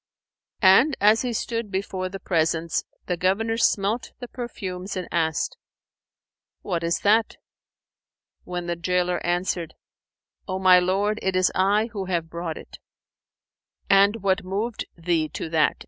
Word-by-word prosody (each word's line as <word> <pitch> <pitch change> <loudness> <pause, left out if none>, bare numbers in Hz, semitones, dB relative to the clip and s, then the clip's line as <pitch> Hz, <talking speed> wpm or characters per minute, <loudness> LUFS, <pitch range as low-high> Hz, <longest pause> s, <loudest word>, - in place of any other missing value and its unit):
And 215 +10 +6
as 215 +2 +5
he 250 - -2
stood 230 -1 -3
before 190 -1 -3
the 195 +1 -7
presence, 165 -2 0 0.2
the 180 - -1
Governor 195 +6 0
smelt 215 +1 +1
the 245 - -7
perfumes 195 -6 -6
and 180 - -4
asked, 160 -2 0 1.1
"What 170 -1 -2
is 170 0 0
that?" 215 +2 +2 1.1
when 180 -1 -5
the 170 0 -2
gaoler 180 +1 0
answered, 175 -1 -1 0.7
"O 185 -1 -2
my 185 -1 +6
lord, 200 +4 0
it 190 -1 -1
is 185 0 +3
I 205 +4 +2
who 195 -3 -3
have 170 -3 -2
brought 170 -1 -4
it." - - -12 1.1
"And 200 +2 +4
what 195 0 +1
moved 205 +5 -3
thee 165 -2 0
to - - -4
that?" 160 -1 +2
185 Hz, 140 wpm, -24 LUFS, 175-205 Hz, 1.1 s, And